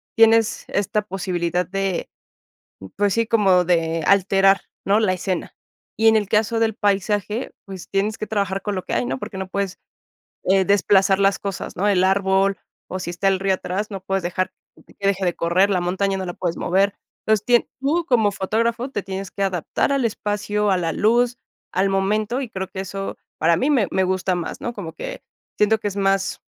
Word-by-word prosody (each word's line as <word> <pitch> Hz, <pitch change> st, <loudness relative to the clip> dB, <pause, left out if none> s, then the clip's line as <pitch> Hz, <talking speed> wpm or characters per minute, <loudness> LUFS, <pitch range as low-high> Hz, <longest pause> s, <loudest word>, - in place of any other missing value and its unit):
tienes 225 Hz, -1 st, +4 dB
esta 205 Hz, +1 st, 0 dB
posibilidad 180 Hz, -3 st, -2 dB
de, 195 Hz, 0 st, -2 dB, 0.9 s
pues 205 Hz, -1 st, +2 dB
sí, 230 Hz, -1 st, +1 dB
como 195 Hz, -5 st, +4 dB
de 165 Hz, -2 st, +1 dB
alterar, 195 Hz, 0 st, +4 dB, 0.2 s
¿no? 205 Hz, +2 st, +4 dB
La 205 Hz, -4 st, +2 dB
escena. 185 Hz, -1 st, -3 dB, 0.4 s
Y 225 Hz, -, +4 dB
en 220 Hz, -, +6 dB
el 210 Hz, -2 st, -1 dB
caso 220 Hz, +2 st, +1 dB
del 225 Hz, -2 st, +1 dB
paisaje, 205 Hz, +3 st, -1 dB
pues 190 Hz, -3 st, -9 dB
tienes 205 Hz, +2 st, 0 dB
que 215 Hz, -, -5 dB
trabajar 200 Hz, -2 st, -1 dB
con 205 Hz, -1 st, -3 dB
lo 185 Hz, -, -3 dB
que -, -, -5 dB
hay, 120 Hz, -, +1 dB
¿no? 130 Hz, +2 st, -2 dB
Porque 190 Hz, +8 st, -7 dB
no 190 Hz, 0 st, -4 dB
puedes, 200 Hz, 0 st, -3 dB, 0.7 s
eh, 190 Hz, 0 st, +3 dB
desplazar 195 Hz, 0 st, +3 dB
las 195 Hz, 0 st, +3 dB
cosas, 195 Hz, -2 st, -5 dB
¿no? 200 Hz, +4 st, +1 dB
El 190 Hz, -3 st, +3 dB
árbol 195 Hz, 0 st, +2 dB, 0.3 s
o 185 Hz, -, -4 dB
si 175 Hz, -1 st, -4 dB
está 180 Hz, +3 st, 0 dB
el 195 Hz, -1 st, +2 dB
río 195 Hz, 0 st, +2 dB
atrás, 190 Hz, +3 st, -3 dB
no 195 Hz, -2 st, -5 dB
puedes 195 Hz, -1 st, -1 dB
dejar 180 Hz, +2 st, -2 dB, 0.5 s
que 200 Hz, -, -2 dB
deje 195 Hz, -1 st, +1 dB
de 175 Hz, -, +1 dB
correr, 180 Hz, +4 st, +2 dB
la 185 Hz, -2 st, +1 dB
montaña 190 Hz, +2 st, 0 dB
no 190 Hz, -, -4 dB
la 175 Hz, -, -5 dB
puedes 170 Hz, -2 st, -2 dB
mover. 195 Hz, +3 st, +2 dB, 0.3 s
Entonces, 215 Hz, -1 st, +2 dB
tien 240 Hz, -1 st, +3 dB
tú 310 Hz, +6 st, +1 dB
como 220 Hz, -7 st, +3 dB
fotógrafo 230 Hz, +6 st, -1 dB
te 205 Hz, -, -3 dB
tienes 190 Hz, 0 st, -5 dB
que 200 Hz, -, -4 dB
adaptar 190 Hz, -, 0 dB
al 275 Hz, -2 st, +1 dB
espacio, 210 Hz, -1 st, -1 dB
a 190 Hz, -, +3 dB
la 165 Hz, -2 st, -1 dB
luz, 240 Hz, +5 st, +2 dB, 0.3 s
al 190 Hz, +2 st, +2 dB
momento, 210 Hz, +5 st, 0 dB
y 250 Hz, -, -6 dB
creo 190 Hz, -2 st, -4 dB
que 190 Hz, 0 st, -6 dB
eso 195 Hz, +1 st, -5 dB, 0.2 s
para 165 Hz, +1 st, +3 dB
mí 270 Hz, -, +1 dB
me 245 Hz, -9 st, +3 dB
me 190 Hz, -, +1 dB
gusta 185 Hz, 0 st, 0 dB
más, 175 Hz, -2 st, -4 dB
¿no? 240 Hz, -, -3 dB
Como 170 Hz, -6 st, -6 dB
que -, -, -7 dB, 0.3 s
siento 215 Hz, +1 st, +3 dB
que 210 Hz, -, -2 dB
es 200 Hz, -, -7 dB
más, 195 Hz, -1 st, 0 dB
195 Hz, 200 wpm, -22 LUFS, 185-210 Hz, 0.9 s, en